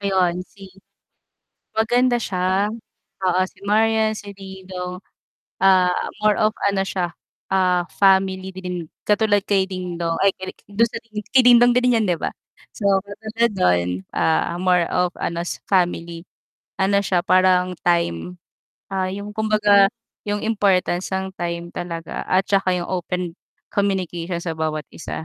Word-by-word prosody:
Ayun, 185 -3 +1
si 195 -2 -14 1.0
maganda 240 +2 +2
siya. 190 0 0 0.6
Oo, 185 0 +2
si - - -20
Marian, 220 +1 +2
si 205 -2 -8
DingDong, 185 -2 -7 0.6
ah, 185 -2 +5 0.3
more 210 -1 +3
of 215 +1 +2
ano 195 -1 +1
siya, 175 -3 -2 0.4
ah, 180 -2 +3 0.2
family 190 -1 +3
dream. 180 -3 -5 0.2
Katulad 210 -1 +2
kay 195 -2 +1
Dingdong, 175 -3 -3
ay 195 - +5
kini 185 - -7 0.2
dun 230 +3 +3
sa - - -11
dini 215 -2 -7 0.2
kay 260 - +7
Dingdong 245 0 +6
din 250 -1 +3
'yan, 215 - 0
'di 175 - +2
ba? - - -3 0.4
So, 200 - -2 0.2
katulad 220 +3 -2
no'n, 90 - +3 0.3
ah, 160 +1 +1
more 180 -1 +2
of 180 0 0
ano, 170 0 -2
s - - -5
family. 170 -3 0 0.6
Ano 200 +1 +2
siya, 180 -3 +1
parang 185 0 +3
time, 175 - 0 0.5
ah, 190 -1 0
yung 205 +1 -6
kumbaga 210 -2 +4 0.4
yung 205 0 -1
importance 195 -4 +1
ng 190 0 -2
time 170 0 -3
talaga 170 -1 -5
at 185 +1 +3
tsaka 195 -2 +2
yung 175 -1 -4
open 180 -1 -3 0.4
communication 180 -3 -1
sa 165 - -2
bawat 155 -2 -2
isa. 160 - -6
190 Hz, 145 wpm, -21 LUFS, 180-205 Hz, 1.0 s, kay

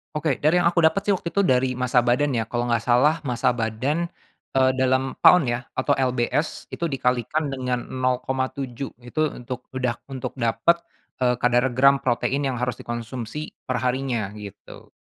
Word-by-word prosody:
Oke. 150 -3 0
Dari 155 +4 +3
yang - - +4
aku 170 - +1
dapet 160 +4 +3
sih 205 - +1
waktu 185 -3 -1
itu 200 +4 +1
dari 130 -4 +3
massa 125 0 +2
badan 125 +4 +2
ya, 115 -3 -1
kalau 120 0 -2
nggak 115 - +3
salah 150 +7 +4
massa 125 -1 +1
badan, 125 +8 -1 0.5
eee, 130 0 +4
dalam 130 0 +2
pound 180 -4 +7
ya, 120 +1 -4
atau 130 +2 0
LBS, 130 +3 0
itu 170 - -2
dikalikan 135 +2 -1
dengan 125 -2 -2
0,7 130 0 -3
itu 125 +6 -6
untuk, 125 -2 -7
udah 125 -2 -1
untuk 135 -2 -5
dapet, 130 +9 +2 0.4
eee, 125 -1 +2
kadar 125 +1 +2
gram 135 +1 +5
protein 135 +3 0
yang 130 - -2
harus 125 -1 -2
dikonsumsi 120 +4 -5 0.2
per 130 - -1
harinya, 125 -5 -1
gitu. 100 -2 -11
130 Hz, 170 wpm, -24 LUFS, 120-140 Hz, 0.5 s, pound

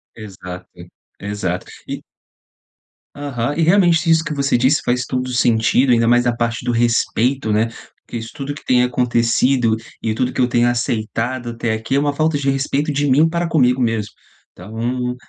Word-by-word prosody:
Exato, 90 -4 -9 0.5
exato 100 -3 -3 0.2
e - - -5 1.1
Aham, 140 -2 -3
e - - +1
realmente 170 -1 +3
isso 160 0 +4
que 165 - -4
você 140 -1 +1
disse 130 +5 +3
faz 125 +1 0
todo 130 -1 -2
o - - -6
sentido, 120 +2 +3
ainda 115 -1 +3
mais 120 +1 +3
a 120 - +1
parte 115 0 -2
do 120 - 0
respeito, 120 +1 +1
né, 110 +2 +2 0.4
porque - - -6
isso 115 0 -6
tudo 140 +1 -4
que 145 - -12
tem 125 -1 +3
acontecido, 125 -1 +2 0.3
e 110 - -1
tudo 125 +3 0
o - - -8
que - - -5
eu 125 - +4
tenha 120 0 +2
aceitado 120 +1 -2
até 115 -1 -2
aqui, 110 +4 -2
é - - +4
uma 145 0 0
falta 155 +1 +1
de 140 -1 -1
respeito 140 +2 -1
de 145 0 0
mim 145 +5 +5
para 170 +1 -2
comigo 130 -5 +2
mesmo, 110 -3 -1 0.4
então 120 +6 -4
125 Hz, 185 wpm, -19 LUFS, 115-140 Hz, 1.1 s, mim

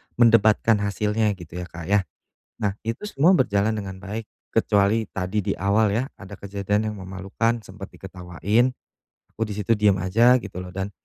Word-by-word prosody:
mendebatkan 115 -2 +4
hasilnya, 105 +2 0
gitu, 90 -1 -9
ya, 90 - -5
Kak, 85 -1 -9
ya. 100 -2 +3 0.5
Nah, 100 -3 -1
itu 115 - -4
semua 165 -1 +3
berjalan 110 - +2
dengan 100 -3 -4
baik, 105 +2 -5 0.2
kecuali 105 +2 +2
tadi 95 +3 -2
di 100 - +2
awal, 100 +2 +2
ya, 120 - +1 0.2
ada 95 +1 -9
kejadian 100 +2 -2
yang 105 - -7
memalukan, 95 +5 -2
sempet 95 0 -9
diketawain, 95 +7 -1 0.6
aku - - -12
di 105 - -5
situ 105 +1 -2
diem 105 -3 +4
aja, 115 +8 +4
gitu, 90 -2 -7
loh, 90 0 -8
dan 95 +1 -3
105 Hz, 170 wpm, -24 LUFS, 95-110 Hz, 0.6 s, mendebatkan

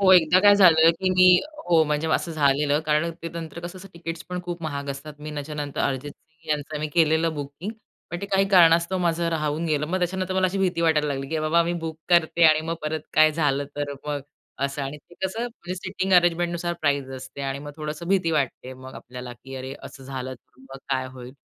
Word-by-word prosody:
हो, 190 -1 +5
एकदा 180 0 +6
काय 205 +1 +7
झालं 165 -5 +7
की 185 -1 +1
मी 185 0 +5 0.3
हो, 170 - +3
म्हणजे 150 +1 -1
असं 170 - 0
झालेलं 145 0 +2
कारण 155 +2 +2
ते 165 - -3
नंतर 165 -1 -7
कसं 175 +2 -7
असं 195 - -11
तिकीट्स 165 0 -6
पण 180 0 -3
खूप 175 -1 -6
महाग 145 -3 -4
असतात. 140 +2 -7
मी 150 +1 -7
त्याच्यानंतर 145 -1 -4
अर्जित 140 +1 -1
सिंग 160 -1 -26
यांचं 150 0 -2
मी 155 - -1
केलेलं 160 0 +3
बुकिंग. 145 +7 -6 0.4
पण 175 - -4
ते 200 - -4
काही 195 0 +2
कारणास्तव 170 0 +5
माझं 170 -1 0
राहून 155 0 -1
गेलं. 150 -1 0
मग 185 +4 -1
त्याच्यानंतर 185 +1 -2
मला 190 0 +3
अशी 190 +2 -2
भीती 185 -3 0
वाटायला 155 -3 +2
लागली 135 -1 -3
की 160 - -1
बाबा 160 +2 +3
मी 170 - -1
बुक 160 -1 -5
करते 170 -1 +4
आणि 155 -1 +6
मग 165 - -1
परत 155 +1 -2
काय 155 0 +6
झालं 145 -3 +1
तर 145 -1 -2
मग 145 -1 -2 0.4
असं. 140 +1 -2
आणि 135 +2 -4
ते 150 +4 -19
कसं 190 +4 -2
म्हणजे 205 -7 -7
सिटींग 190 +1 -3
अरेंजमेंटनुसार 175 0 +2
प्राईस 140 -3 +1
असते 130 +2 -9
आणि 135 0 -2
मग 145 +1 -8
थोडंस 155 +1 -5
भीती 185 -4 +2
वाटते 135 -4 -2
मग 130 0 -11
आपल्याला 125 0 -8
की 130 +3 -12
अरे, 130 +1 -6
असं 135 - -11
झालं 130 -1 -5
तर 125 - -25
मग 135 - -7
काय 130 -1 0
होईल? 125 -1 -10
160 Hz, 220 wpm, -24 LUFS, 145-175 Hz, 0.4 s, काय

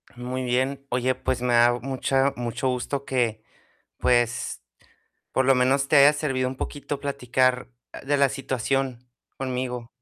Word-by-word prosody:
Muy 125 +1 -4
bien. 130 +2 -1
Oye, 125 +1 0
pues, 125 - -2
me 125 -1 +1
da 120 0 +5
mucha 135 +2 0
mucho 120 +2 -3
gusto 130 +2 -3
que, 115 -4 -1 0.6
pues, 120 - +1 0.7
por 130 - +1
lo 135 - +6
menos 135 +2 +2
te 150 - +4
haya 140 +1 +8
servido 135 -4 -1
un 130 - -4
poquito 145 +1 -5
platicar, 130 -2 0 0.2
ah, - - -9
de 145 +1 0
la 140 -1 +4
situación 130 -1 -2 0.3
conmigo. 125 -2 -3
130 Hz, 150 wpm, -25 LUFS, 125-135 Hz, 0.7 s, haya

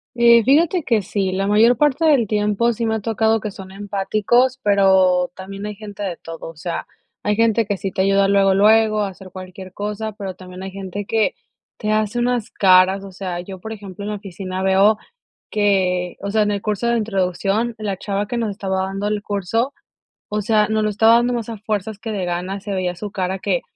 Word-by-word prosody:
Eh, 235 -1 +6
fíjate 325 - +3
que 225 -7 +1
sí, 195 -1 -1
la 195 +1 -1
mayor 220 +4 +4
parte 295 +1 +2
del 285 -7 +4
tiempo 210 +3 +1
sí 230 +1 -3
me 220 0 0
ha - - -1
tocado 220 +1 +1
que 210 0 -5
son 190 -1 -11
empáticos, 210 +6 +1
pero 190 -3 +4
también 195 +2 -8
hay 210 - -6
gente 205 -1 -9
de 185 -4 -3
todo. 165 0 -8
O 165 - -12
sea, 170 +2 -5 0.4
hay 210 - +1
gente 230 0 +2
que 205 -1 -2
sí 195 0 -4
te 190 - -1
ayuda 195 0 +3
luego, 195 -1 +4
luego 215 +1 +4
a 200 - -1
hacer 190 0 -12
cualquier 185 0 -9
cosa, 210 +2 -4
pero 195 -2 -6
también 185 0 -10
hay 190 - -6
gente 195 +1 -6
que 220 0 +1 0.4
te 215 - -2
hace 215 +2 0
unas 240 -2 0
caras. 190 0 +4
O 195 - -9
sea, 180 -2 -5
yo 190 +1 -9
por 220 +4 -8
ejemplo 200 -2 -8
en 210 - -4
la 210 - -2
oficina 190 -1 -6
veo 195 +3 +4 0.5
que 185 -4 +1
o 200 - -3
sea, 220 - +2
en 210 0 +2
el 200 -1 -2
curso 215 +2 -1
de 235 - +2
introducción 205 +2 -1
la 205 -3 -3
chava 200 +1 -2
que 240 - -3
nos 225 -2 -1
estaba 190 -2 -2
dando 195 +2 -3
el 210 -1 -1
curso, 225 +7 -1 0.6
o 210 0 -1
sea, 210 0 +2
nos 220 0 +1
lo 215 - +1
estaba 220 +3 +5
dando 240 +1 +2
más 235 -1 -3
a 225 - -5
fuerzas 210 0 -3
que 225 -1 -5
de 195 -3 -2
ganas. 180 +3 -3
Se 205 - -5
veía 180 -1 -1
su 205 +3 -6
cara 190 0 -2
que 185 -3 0
205 Hz, 220 wpm, -20 LUFS, 190-220 Hz, 0.6 s, Eh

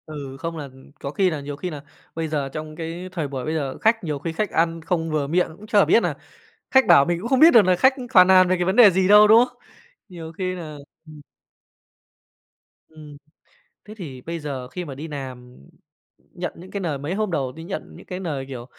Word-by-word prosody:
Ừ, 140 -3 -8
không 165 +2 -5
là 145 -3 -7 0.3
có 140 - -5
khi 190 +4 +1
là 155 -4 -4
nhiều 145 0 -6
khi 180 +5 -5
là 150 -4 -8 0.3
bây 165 0 -3
giờ 145 -3 -2
trong 155 +2 -7
cái 170 +3 -6
thời 165 -5 -3
buổi 130 -2 -6
bây 155 - -2
giờ 140 -4 -3
khách 225 0 +1
nhiều 150 -4 -3
khi 160 +3 -5
khách 210 +4 -2
ăn 165 0 0
không 165 0 -2
vừa 150 -2 -1
miệng 175 +5 +1
cũng 215 - -13
chả 210 -2 +4
biết 230 - +3
nà - - -1 0.6
khách 265 -2 +5
bảo 170 -7 +7
mình 175 +2 -1
cũng 230 - -5
không 265 0 +2
biết 320 +2 +9
được 230 - +7
là 185 -1 +2
khách 260 +8 +4 0.2
phàn 185 -1 +7
nàn 185 -1 +6
về 185 - +2
cái 175 - -1
vấn 190 +3 0
đề 230 -5 +8
gì 185 +1 +1
đâu, 210 +1 +7
đúng 225 +3 +7
không? - - -25 0.5
Nhiều 165 -4 -9
khi 185 +2 -3
nà 160 -4 -8 0.3
ừm. 155 -1 -13 1.7
Ừm. 150 -2 -13 0.7
Thế 210 - -10
thì 140 - -9
bây 165 +4 -6
giờ 140 -4 -6
khi 175 +8 -7
mà 140 -4 -8
đi 150 +4 -7
làm, 130 -4 -9 0.8
nhận - - -5
những 180 +2 -13
cái 200 - -4
lời 160 -6 -2
mấy 145 +5 -4
hôm 210 -1 -2
đầu 135 -6 -2
đi 160 +5 -11
nhận 190 +3 -7
những - - -14
cái 180 -1 -6
lời, 150 -8 -4
kiểu, 125 -3 -7
165 Hz, 235 wpm, -22 LUFS, 145-185 Hz, 1.7 s, biết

